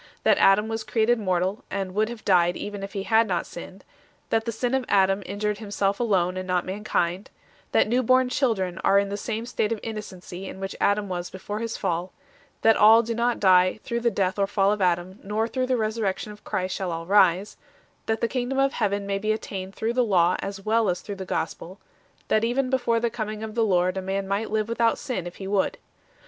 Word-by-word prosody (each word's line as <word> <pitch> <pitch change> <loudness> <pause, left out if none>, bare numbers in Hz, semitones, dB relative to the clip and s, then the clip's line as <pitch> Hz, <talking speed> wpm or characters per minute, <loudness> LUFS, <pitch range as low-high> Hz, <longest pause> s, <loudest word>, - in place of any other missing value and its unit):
That - - +4
Adam 200 +2 +5
was 225 0 -3
created 230 +1 +1
mortal, 185 0 -1
and 190 -1 -3
would 215 +2 +1
have 235 -2 -9
died 175 -2 +3
even 205 -1 -6
if 195 0 -7
he 195 -2 -3
had 225 +2 +3
not 180 -3 -1
sinned; 185 +2 -10 0.5
that 225 0 +1
the 230 - -1
sin 240 +3 -2
of 265 -1 +1
Adam 195 0 +3
injured 210 0 -2
himself 200 -2 -1
alone, 185 -6 +1
and 185 0 -4
not 180 -1 0
mankind; 190 -1 -2 0.4
that - - +3
new 245 +3 +2
born 255 +1 +3
children 215 -9 0
are 195 - +4
in 200 0 +2
the 200 - -3
same 220 +2 -4
state 220 -2 -1
of 225 - -1
innocency 195 -4 -7
in 190 - -8
which 195 0 -5
Adam 205 0 +2
was 175 -2 -4
before 205 +3 -6
his 230 0 -3
fall; 175 +2 -2 0.5
that 225 0 +6
all 225 +2 +7
do 230 +1 -3
not 235 +1 0
die 185 +1 +4
through 235 -1 -2
the 235 0 +2
death 195 -2 -1
or 195 - +2
fall 195 0 +2
of 210 -1 -1
Adam, 180 +1 0
nor 215 +3 -1
through 255 +2 -2
the 255 - +2
Resur 220 0 -1
rection 200 +1 -2
of 210 0 -14
Christ 185 0 -2
shall 185 -2 -3
all 165 0 -4
rise; 190 0 +3 0.5
that 220 0 0
the 235 - +2
Kingdom 250 +2 -2
of 275 0 +2
Heaven 200 0 -1
may 200 0 -1
be 215 +2 0
attained 195 -3 -5
through 225 +2 -1
the 250 0 +2
Law 180 -5 +3
as 195 0 -6
well 220 -1 +2
as 180 - -1
through 200 -1 -7
the 190 - -6
Gospel; 175 +3 -4 0.5
that 215 - +2
even 255 +3 0
before 240 -3 +1
the 235 0 -1
coming 215 -2 -4
of 220 -1 -6
the 230 0 +1
Lord 185 -2 +2
a - - -1
man 195 +1 -2
might 200 +3 -1
live 215 0 0
without 230 0 +1
sin, 245 - -4
if 175 - -9
he 195 - -8
would. 200 - 0
205 Hz, 230 wpm, -25 LUFS, 190-225 Hz, 0.5 s, all